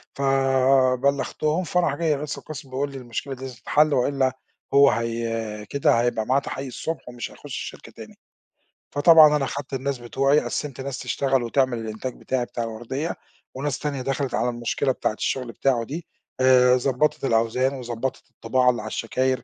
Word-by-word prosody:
فبلغتهم 135 +3 +2
فراح 175 -4 +1
جاي 155 -1 +1
رئيس 145 +1 -4
القسْم 150 -2 -9
بيقول 140 +2 -2
لي 135 - -7
المشكلة 125 +2 -5
دي 130 0 -7
تتحل 145 +5 +2
وإلا 130 0 +1 0.4
هو 140 0 +7
هي 115 -2 -3
كده 135 -4 +3
هيبقى 120 -2 0
معاه 130 +4 +3
تحقيق 135 -1 -5
الصبح 160 +3 -5
ومش 120 -1 -6
هيخش - - -16
الشركة - - -7
تاني. - - -12 0.8
فطبعًا 150 0 +7
أنا 140 - +1
خدت 140 0 -6
الناس 135 +1 -2
بتوعي 135 +4 +2
قَسِّمت 140 -4 -4
ناس 135 -1 -5
تشتغل 135 -2 0
وتعمل 130 +1 +1
الإنتاج 115 +3 -5
بتاعي 130 -2 -1
بتاع 120 - -4
الوردية، 120 +8 -4 0.4
وناس 135 0 -3
تانية 140 -3 -3
دخلِت 135 0 -2
على 125 - +1
المشكلة 120 +3 -1
بتاعة 125 - -1
الشغل 125 +2 -2
بتاعه 125 -3 +1
دي 155 +8 -6 0.4
آآ، 125 -1 +6
ضبّطِت 135 +3 0
الأوزان 115 +3 +1
وضبّطِت 125 0 -5
الطباعة 125 +2 +1
اللي 120 - 0
على - - -7
الشكاير 130 +3 -1
130 Hz, 160 wpm, -24 LUFS, 120-140 Hz, 0.8 s, هو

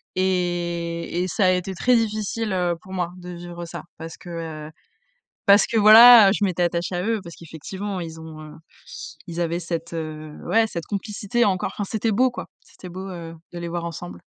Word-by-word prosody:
et 175 -2 -1
et - - -2
ça 185 +2 +1
a 185 - +5
été 185 +1 -1
très 250 +7 +3
difficile, 215 0 -1
heu, 180 -2 +1
pour 190 - -11
moi 175 -2 -2
de 180 0 -10
vivre 175 0 -8
ça. 170 - -8
Parce 165 +1 -8
que, 175 - -12 0.4
heu, - - -12 0.7
parce 200 +1 +6
que 230 - -1
voilà, 220 +1 +10
heu, - - +3
je 205 - -2
m'étais 180 -2 -1
attachée 175 +1 -1
à 180 - -2
eux. 225 0 -1
Parce 170 -1 -10
qu'effectivement 185 +5 -6
ils 160 -1 -7
ont, 160 -1 -10
heu, 155 0 -10 0.8
ils 170 0 -6
avaient 170 0 -1
cette, 170 0 -5
heu, 155 -1 -6
ouais, 225 0 +3
cette 170 -5 -6
complicité 210 +3 -1
encore. 190 -1 0
Enfin, 205 - -3
c'était 220 0 0
beau 250 +4 +3
quoi. - - -7
C'était 180 - -13
beau, 185 +2 -7
heu, 165 -2 -7 0.2
de 175 - -6
les 170 0 -5
voir 170 0 -3
ensemble. 90 - -7
180 Hz, 205 wpm, -23 LUFS, 170-205 Hz, 0.8 s, voilà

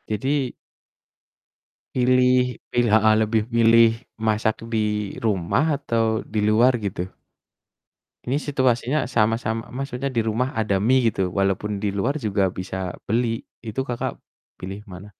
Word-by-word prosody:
Jadi 135 +3 -1 1.4
pilih 125 0 +3
pilih 120 -2 +2
heeh, 110 0 +5
lebih 110 0 +1
milih 115 0 +6 0.4
masak 110 0 +1 0.2
di 105 -2 -1
rumah 115 - +1
atau 115 -4 0
di 105 - +1
luar 120 +4 +4
gitu? 90 -2 -3 1.2
Ini 135 +4 0
situasinya 130 0 +1
sama-sama 115 -1 0
maksudnya 135 +1 -4
dirumah 120 +2 -1
ada 100 -3 +1
mie 120 0 +3
gitu, 95 -1 -1
walaupun 100 +2 -1
diluar 105 +8 0
juga 100 -7 0
bisa 95 0 -5
beli, 115 +1 -1 0.2
itu 115 +2 -4
Kakak 120 -2 -3 0.4
pilih 95 +3 -7
mana? 95 +3 -11
115 Hz, 120 wpm, -23 LUFS, 105-125 Hz, 1.4 s, milih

